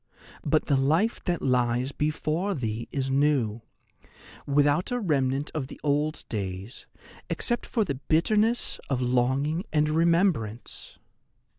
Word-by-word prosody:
But - - +2
the 140 - +2
life 160 - +1
that 175 -2 -1
lies 125 0 +1
before 155 +6 -1
thee 115 -4 -3
is 135 -2 -2
new, 135 -6 +1 0.9
without 145 +4 +2
a 245 - 0
remnant 140 - 0
of 145 -4 -3
the - - -11
old 150 +1 0
days, 100 +2 -5 0.4
except 240 -1 -1
for 225 - +1
the 170 - -2
bitterness 215 +8 +2
of 135 -3 0
longing 130 +7 +1
and 150 -1 +2
remembrance. 160 - 0
145 Hz, 125 wpm, -27 LUFS, 125-165 Hz, 0.9 s, But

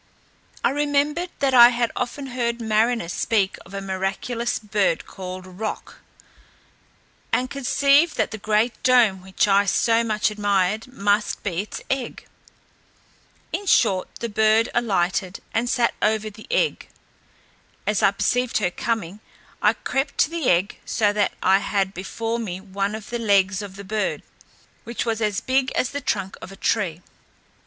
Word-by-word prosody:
I - - +3
remembered 295 +4 0
that 275 -2 +2
I 240 -1 +10
had 240 -1 0
often 275 +3 -3
heard 235 -1 -1
mariners 220 -4 +1
speak 200 -4 0
of 195 - -10
a 195 - -3
miraculous 195 +5 -2
bird 205 -5 0
called 185 0 -8
Roc, 190 +4 -6 1.3
and 255 +1 0
conceived 280 +4 +3
that - - 0
the 220 - -6
great 215 +3 0
dome 235 -7 +4
which 190 +2 0
I 200 0 +4
so 230 +3 +2
much 215 -1 0
admired 205 +1 0
must 205 -3 0
be 185 -3 -1
its 210 - -8
egg. 270 -2 -3 1.3
In 405 - -3
short, 195 - +3
the 235 - -1
bird 220 +1 +3
alighted, 190 -4 0
and 235 +2 0
sat 240 -2 +2
over 215 0 +1
the 215 +1 -14
egg. - - 0 1.0
As 210 -1 +1
I - - +6
perceived 245 +5 0
her 185 -5 0
coming, 210 -3 -3 0.4
I - - +4
crept 270 +2 -2
to 300 - +2
the 330 -6 0
egg, 180 +3 +1
so 205 -2 +1
that 205 -1 +1
I 190 +1 +5
had 195 -1 -1
before 225 +5 -3
me 185 -6 -4
one 195 +1 -3
of 220 0 -9
the 240 - -2
legs 200 -2 +2
of 200 -2 -8
the 200 - -8
bird, 210 +2 -2 0.6
which 235 0 -4
was 225 -1 -1
as 210 -2 0
big 260 0 +1
as 255 - 0
the 285 0 -4
trunk 195 -6 -2
of - - -9
a - - -10
tree. 180 -6 -1
215 Hz, 160 wpm, -23 LUFS, 195-240 Hz, 1.3 s, I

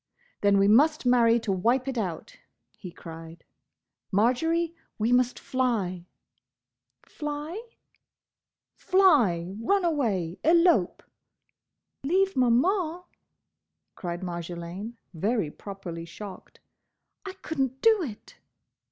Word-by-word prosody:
"Then 200 -1 +4
we 195 0 +4
must 290 +8 +4
marry 240 -1 +4
to 215 - -2
wipe 235 +8 +1
it 265 - -2
out!" 220 - -4 0.4
he 185 - -9
cried. 165 0 -11 0.7
"Marjory, 320 - +1 0.2
we 225 +2 0
must 250 0 +2
fly!" 205 -9 -2 1.0
"Fly—?" 300 +6 -5 1.1
"Fly!—run 240 - +2
away!—elope!" 255 - +2 1.0
"Leave 380 +7 +1
Maman—!" 320 - +2 0.9
cried 175 -2 -5
Marjolaine, 175 +5 -6 0.2
very 200 -1 -1
properly 175 -4 -8
shocked. 185 +3 -11 0.6
"I 385 - -6
could 320 -5 -7
n't 265 0 0
do 445 -3 +5
it!" 235 -11 -8
235 Hz, 90 wpm, -27 LUFS, 185-310 Hz, 1.1 s, do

